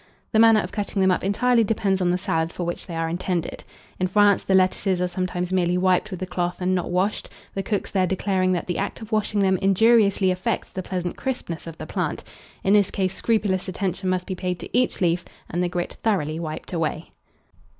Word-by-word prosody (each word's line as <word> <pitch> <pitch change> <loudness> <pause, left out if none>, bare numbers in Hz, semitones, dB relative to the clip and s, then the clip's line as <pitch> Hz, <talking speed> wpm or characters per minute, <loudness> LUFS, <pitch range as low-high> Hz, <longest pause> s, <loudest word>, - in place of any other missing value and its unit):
The 220 - +3
manner 225 -1 +7
of 180 - -6
cutting 205 -1 -2
them 190 -1 +4
up 180 - 0
entirely 230 +4 +3
depends 200 -3 0
on 180 - +2
the 180 - +2
salad 170 -4 -1
for 180 - -5
which 175 +2 -4
they 170 - -6
are 165 0 -1
intended. 175 0 -2 0.4
In 185 - +1
France 205 +1 +4
the 190 - +2
lettuces 185 0 +2
are 180 - +1
sometimes 180 0 -3
merely 180 -1 +2
wiped 185 +2 +2
with 185 -4 -6
a - - -1
cloth 180 -1 -2
and 185 0 +1
not 180 -2 -1
washed, 185 +4 0 0.2
the 195 - -2
cooks 200 0 -2
there 185 -2 +2
declaring 190 0 +1
that 175 - -2
the 175 - -2
act 200 +3 -3
of 220 +1 -9
washing 210 -1 +1
them 190 -1 +3
injuriously 200 -1 +4
affects 185 0 -2
the 190 - -4
pleasant 180 -1 -4
crispness 210 -12 -4
of 165 -1 -8
the - - -6
plant: - - -3 0.4
in 195 - +3
this 205 -2 +4
case 190 -1 -1
scrupulous 205 -3 0
attention 185 0 -2
must 185 0 0
be 190 - -4
paid 180 -1 -3
to - - -7
each 250 -4 +1
leaf, 175 -1 +2 0.3
and 175 - -1
the 180 - +1
grit 175 -1 -3
thoroughly 160 -8 0
wiped 155 +2 -6
away. 160 -1 -2
185 Hz, 220 wpm, -24 LUFS, 180-200 Hz, 0.4 s, manner